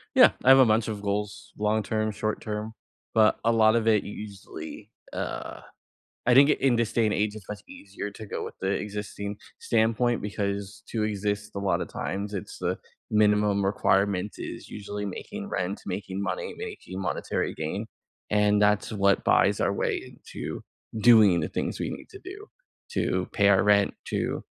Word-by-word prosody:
Yeah. -, -, +8 dB
I 130 Hz, -, +5 dB
have 135 Hz, 0 st, +9 dB
a 130 Hz, -, +8 dB
bunch 110 Hz, 0 st, +2 dB
of 105 Hz, -2 st, -4 dB
goals, 105 Hz, 0 st, -3 dB
long-term, 110 Hz, 0 st, 0 dB
short-term, 110 Hz, +1 st, -3 dB, 0.4 s
but 110 Hz, -1 st, +4 dB
a 115 Hz, -, +5 dB
lot 110 Hz, -1 st, +5 dB
of 115 Hz, -1 st, +1 dB
it 110 Hz, -2 st, +4 dB
u -, -, -7 dB
usually, 100 Hz, 0 st, -9 dB, 0.2 s
uh -, -, -5 dB, 0.6 s
I 125 Hz, -, +5 dB
think 140 Hz, +3 st, +7 dB
i -, -, +6 dB
in 135 Hz, -3 st, +3 dB
this 115 Hz, -2 st, 0 dB
day 115 Hz, -, +3 dB
and 105 Hz, -, +1 dB
age, 105 Hz, +1 st, 0 dB
it's 105 Hz, -3 st, -11 dB
much 105 Hz, -1 st, -6 dB
easier 100 Hz, +1 st, -7 dB
to 110 Hz, +2 st, -9 dB
go -, -, -4 dB
with -, -, -7 dB
the 95 Hz, -, 0 dB
existing 105 Hz, 0 st, -4 dB, 0.2 s
standpoint 115 Hz, +1 st, +1 dB
because 100 Hz, 0 st, -3 dB
to 110 Hz, -2 st, -1 dB
exist 105 Hz, 0 st, -2 dB
a 100 Hz, -, -2 dB
lotta 100 Hz, -1 st, 0 dB
times, 100 Hz, +2 st, -4 dB
it's 95 Hz, -, -6 dB
the -, -, -1 dB, 0.3 s
minimum 105 Hz, -1 st, +3 dB
requirement 100 Hz, 0 st, +1 dB
is -, -, -7 dB
usually 105 Hz, 0 st, -5 dB
making 205 Hz, -, -6 dB
rent, 95 Hz, +2 st, -2 dB
making 100 Hz, -1 st, -4 dB
money, 100 Hz, -, -3 dB
making 95 Hz, +2 st, -7 dB
monetary -, -, -2 dB
gain, -, -, -3 dB, 0.4 s
and 105 Hz, 0 st, +3 dB
that's 105 Hz, +1 st, +2 dB
what 100 Hz, -2 st, +2 dB
buys -, -, +3 dB
our -, -, +2 dB
way -, -, 0 dB
into -, -, -7 dB, 0.4 s
doing 110 Hz, -6 st, +7 dB
the 80 Hz, -, -1 dB
things -, -, -3 dB
we -, -, -2 dB
need -, -, -8 dB
to 395 Hz, -, -11 dB
do, 410 Hz, +3 st, -9 dB, 0.4 s
to 90 Hz, -1 st, 0 dB
pay 100 Hz, -1 st, +3 dB
our 95 Hz, -1 st, +5 dB
rent, 100 Hz, -1 st, +4 dB, 0.2 s
to, -, -, -2 dB
105 Hz, 175 wpm, -27 LUFS, 100-110 Hz, 0.6 s, have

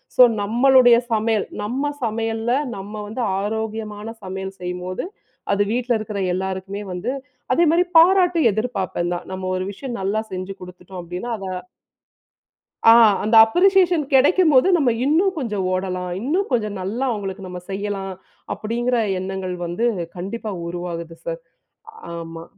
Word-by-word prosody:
So 250 Hz, -, +8 dB, 0.2 s
நம்மளுடைய 245 Hz, +3 st, +5 dB, 0.2 s
சமையல் 220 Hz, -1 st, +1 dB, 0.2 s
நம்ம 260 Hz, +8 st, -1 dB
சமையல 225 Hz, 0 st, -1 dB, 0.2 s
நம்ம 195 Hz, +2 st, -8 dB
வந்து 220 Hz, +4 st, -5 dB, 0.2 s
ஆரோக்கியமான 215 Hz, 0 st, -4 dB, 0.2 s
சமையல் 190 Hz, +1 st, -5 dB
செய்யும்போது 180 Hz, +1 st, -4 dB, 0.5 s
அது 200 Hz, 0 st, +2 dB
வீட்டில் 245 Hz, 0 st, +1 dB
இருக்கிற 215 Hz, -1 st, -5 dB
எல்லாருக்குமே 190 Hz, +2 st, -4 dB
வந்து 180 Hz, +8 st, -3 dB, 0.4 s
அதே 340 Hz, -, +4 dB
மாரி 345 Hz, +2 st, +4 dB
பாராட்டு 355 Hz, 0 st, +5 dB
எதிர்ப்பார்ப்பேன் 195 Hz, -5 st, -2 dB
தான். 175 Hz, -, -5 dB
நம்ம 185 Hz, 0 st, -4 dB
ஒரு 185 Hz, -, -2 dB
விஷயம் 240 Hz, +4 st, -6 dB
நல்லா 200 Hz, +3 st, 0 dB
செஞ்சு 185 Hz, +1 st, -5 dB
குடுத்துட்டோம். 180 Hz, 0 st, -10 dB
அப்படீன்னா 180 Hz, +7 st, -5 dB
அத 195 Hz, -2 st, -7 dB, 1.4 s
ஆ. -, -, +10 dB, 0.3 s
அந்த 220 Hz, +2 st, +2 dB
அப்ரிஷியேஷன் 360 Hz, -, +3 dB
கிடைக்கும்போது, 295 Hz, +2 st, +5 dB
நம்ம 275 Hz, -5 st, +2 dB, 0.2 s
இன்னும் 350 Hz, +7 st, +3 dB
கொஞ்சம் 210 Hz, -9 st, -2 dB
ஓடலாம். 185 Hz, -1 st, -2 dB
இன்னும் 340 Hz, -, 0 dB
கொஞ்சம் 215 Hz, -5 st, 0 dB
நல்லா 225 Hz, +8 st, -2 dB
அவங்களுக்கு 195 Hz, -3 st, -5 dB
நம்ம 180 Hz, 0 st, -7 dB
செய்யலாம். 195 Hz, -1 st, -3 dB, 0.4 s
அப்படிங்கிற 240 Hz, +3 st, -1 dB, 0.2 s
எண்ணங்கள் 185 Hz, -1 st, -4 dB
வந்து 175 Hz, +7 st, -1 dB, 0.3 s
கண்டிப்பா 210 Hz, +4 st, -5 dB, 0.2 s
உருவாகுது 170 Hz, -1 st, -5 dB
சார். 165 Hz, 0 st, -4 dB, 0.8 s
ஆமா. 165 Hz, 0 st, -7 dB
210 Hz, 130 wpm, -21 LUFS, 185-245 Hz, 1.4 s, ஆ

